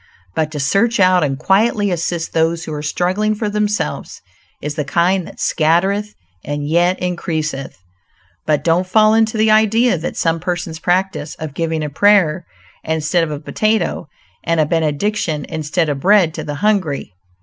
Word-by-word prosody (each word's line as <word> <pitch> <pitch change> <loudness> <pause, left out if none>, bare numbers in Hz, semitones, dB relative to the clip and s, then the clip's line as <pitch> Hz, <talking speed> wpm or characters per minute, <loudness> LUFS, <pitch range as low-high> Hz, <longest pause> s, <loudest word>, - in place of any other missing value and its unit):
But 155 +5 -1
to 150 - -4
search 200 +12 +1
out 185 -2 +4
and 135 -2 -1
quietly 205 +4 +2
assist 170 -1 -2
those 165 0 +1
who 155 - -6
are 150 - -4
struggling 185 +7 0
for 210 0 -2
themselves, 210 0 -2 0.4
is 150 0 -4
the 150 0 -2
kind 175 +4 +1
that - - -13
"scattereth 190 +6 +1 0.3
and 145 0 -4
yet 175 +4 +2
increaseth." 160 -6 -3 0.7
But 150 -2 +1
don't 175 +2 +1
fall 215 +3 +4
into 220 0 +2
the 215 0 +3
idea 220 -1 +3
that 165 - -5
some 165 0 +1
persons 175 -2 -4
practice, 180 -3 -1
of 155 -3 -7
giving 160 0 -2
a 150 - -3
prayer 185 -2 +3 0.4
instead 160 +2 0
of 165 - -2
a 150 -1 -4
potato, 195 0 -1 0.4
and 165 -1 0
a 155 - +4
benediction 160 0 -1
instead 160 +1 -2
of 145 -2 -2
bread, 185 -1 +4
to - - -5
the 145 - -5
hungry. 185 - -1
170 Hz, 165 wpm, -18 LUFS, 155-205 Hz, 0.7 s, out